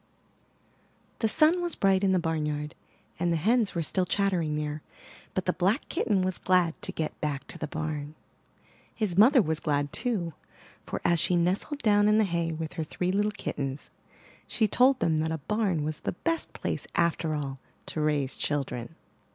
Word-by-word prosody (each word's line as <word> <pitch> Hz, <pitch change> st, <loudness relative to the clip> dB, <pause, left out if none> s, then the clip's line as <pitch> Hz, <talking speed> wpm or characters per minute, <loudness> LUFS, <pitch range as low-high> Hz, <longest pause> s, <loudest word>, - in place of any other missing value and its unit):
The 220 Hz, -, +2 dB
sun 320 Hz, +9 st, +5 dB
was 345 Hz, -2 st, -2 dB
bright 195 Hz, 0 st, +3 dB
in 195 Hz, -, +3 dB
the 185 Hz, -, +3 dB
barnyard, 150 Hz, -3 st, -2 dB, 0.5 s
and 175 Hz, 0 st, +1 dB
the -, -, +2 dB
hens 215 Hz, +4 st, +2 dB
were 170 Hz, -, 0 dB
still 180 Hz, +4 st, +1 dB
chattering 180 Hz, -7 st, +1 dB
there; 150 Hz, 0 st, -3 dB, 0.5 s
but 185 Hz, -, -1 dB
the 180 Hz, -, +1 dB
black 195 Hz, -, +1 dB
kitten 210 Hz, -, +1 dB
was 185 Hz, -1 st, -2 dB
glad 180 Hz, -3 st, +3 dB
to -, -, -2 dB
get 160 Hz, -, -4 dB
back 145 Hz, -2 st, -2 dB
to -, -, -9 dB
the 155 Hz, -, -3 dB
barn. 155 Hz, -1 st, -4 dB, 0.8 s
His 210 Hz, -6 st, -1 dB
mother 240 Hz, -, +6 dB
was 160 Hz, -1 st, -1 dB
glad 145 Hz, -1 st, -1 dB
too; 195 Hz, -10 st, -1 dB, 0.5 s
for, -, -, -4 dB
as 170 Hz, -1 st, +3 dB
she 180 Hz, -, +2 dB
nestled 185 Hz, -, 0 dB
down 205 Hz, -2 st, +4 dB
in 210 Hz, 0 st, +4 dB
the 220 Hz, -, +5 dB
hay 170 Hz, -3 st, -1 dB
with 160 Hz, 0 st, -5 dB
her 165 Hz, -3 st, -3 dB
three 180 Hz, +4 st, -2 dB
little 205 Hz, +2 st, +2 dB
kittens, 140 Hz, -8 st, -5 dB, 0.6 s
she 220 Hz, -, +1 dB
told 255 Hz, +5 st, +4 dB
them 160 Hz, -1 st, +2 dB
that 160 Hz, +1 st, 0 dB
a 160 Hz, -, -1 dB
barn 190 Hz, -1 st, 0 dB
was 155 Hz, 0 st, -3 dB
the -, -, -3 dB
best 330 Hz, -, -1 dB
place -, -, -3 dB
after 165 Hz, -2 st, +1 dB
all 135 Hz, -3 st, -4 dB, 0.3 s
to 155 Hz, -, -3 dB
raise 145 Hz, -3 st, 0 dB
children. 140 Hz, -1 st, -3 dB
170 Hz, 185 wpm, -28 LUFS, 155-205 Hz, 0.8 s, mother